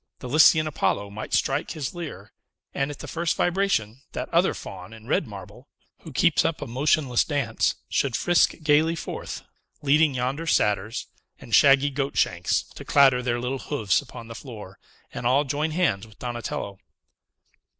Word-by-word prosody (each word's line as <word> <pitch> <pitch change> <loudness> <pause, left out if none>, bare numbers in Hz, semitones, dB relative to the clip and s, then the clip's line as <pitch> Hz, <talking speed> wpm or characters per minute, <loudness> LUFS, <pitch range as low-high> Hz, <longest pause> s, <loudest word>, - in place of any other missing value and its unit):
The 125 - -8
Lycian 155 +3 +6
Apollo 100 - -1
might 110 +1 -7
strike 135 +3 0
his 150 -5 -4
lyre; 170 -4 -8 0.4
and, 140 +1 -1
at 145 - -7
the - - -9
first 170 0 -1
vibration, 175 - 0
that - - -4
other 175 +3 +3
Faun 95 +2 -9
in 110 -1 -13
red 130 - 0
marble, 105 +5 -11 0.3
who 160 - -11
keeps 165 +4 +3
up 165 0 -1
a - - -5
motionless 130 0 +1
dance, 140 -7 0
should 135 -4 0
frisk 175 0 +3
gayly 155 +2 +3
forth, - - -6 0.4
leading 145 0 +3
yonder 130 +6 -2
Satyrs, 105 -1 +1 0.3
with 120 -4 -11
shaggy 140 +4 +6
goat 140 +1 -3
shanks, 90 0 +1
to - - -12
clatter 135 -3 +4
their 120 -1 -1
little 125 +2 -3
hoofs 110 -11 0
upon 115 - -11
the 115 - -8
floor, 110 -6 -10 0.3
and 120 - -2
all 135 +4 +3
join 150 +3 -1
hands 155 - 0
with 110 - -19
Donatello! 120 -5 -5
135 Hz, 165 wpm, -25 LUFS, 115-150 Hz, 0.4 s, Lycian